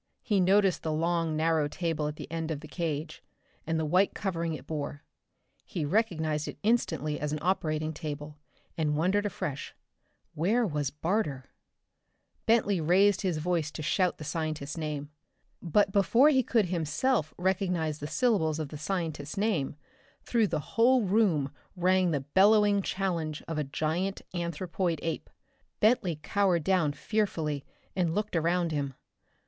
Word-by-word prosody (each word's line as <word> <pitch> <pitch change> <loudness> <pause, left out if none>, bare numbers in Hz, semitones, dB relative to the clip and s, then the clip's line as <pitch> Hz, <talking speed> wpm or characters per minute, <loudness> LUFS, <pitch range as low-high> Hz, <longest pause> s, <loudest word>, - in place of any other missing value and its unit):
He 205 -4 +2
noticed 195 0 +3
the 160 - -2
long 165 0 0
narrow 160 -1 +2
table 160 -1 -2
at 150 - -4
the - - -7
end 165 -1 -3
of 150 -3 -3
the 155 - -9
cage, 160 -2 -3 0.5
and 160 0 0
the 160 - 0
white 180 +6 +2
covering 170 -4 -2
it 130 - -10
bore. 145 -1 -4 0.6
He 160 -4 -3
recognized 160 -5 0
it - - -6
instantly 200 -9 +1
as 150 0 -2
an 150 - -1
operating 155 -4 0
table, 150 -1 -6 0.4
and 150 -2 0
wondered 195 +6 +2
afresh. 170 -8 -5 0.6
Where 215 +10 +2
was 150 -7 -1
Barter? 150 -4 -1 1.0
Bentley 205 -5 +3
raised 190 +5 +4
his 185 -5 0
voice 165 -1 0
to 155 - -7
shout 180 +3 +1
the - - -8
scientist's 155 -1 -3
name. 150 -2 -4 0.5
But 195 +4 +2
before 230 +8 +5
he 265 -3 +4
could 225 -3 +2
himself 165 - 0
recognize 180 -4 0
the 145 - -4
syllables 160 -3 +1
of 155 -3 -4
the 150 - -8
scientist's 160 -3 -3
name, 195 -10 0 0.5
through 230 -3 +2
the - - -1
whole 245 +1 +5
room 185 -9 +2 0.2
rang 185 0 +3
the 145 -4 0
bellowing 200 +7 +4
challenge 170 -6 -2
of 165 -2 -2
a - - +1
giant 160 +7 -2
anthropoid 170 0 -2
ape. 165 -2 -3 0.5
Bentley 205 -8 +2
cowered 185 -2 +2
down 170 -5 +2
fearfully 155 -6 -1 0.3
and 175 -3 +1
looked 210 -2 -2
around 170 +1 +1
him. 140 -3 -2
165 Hz, 150 wpm, -29 LUFS, 155-195 Hz, 1.0 s, before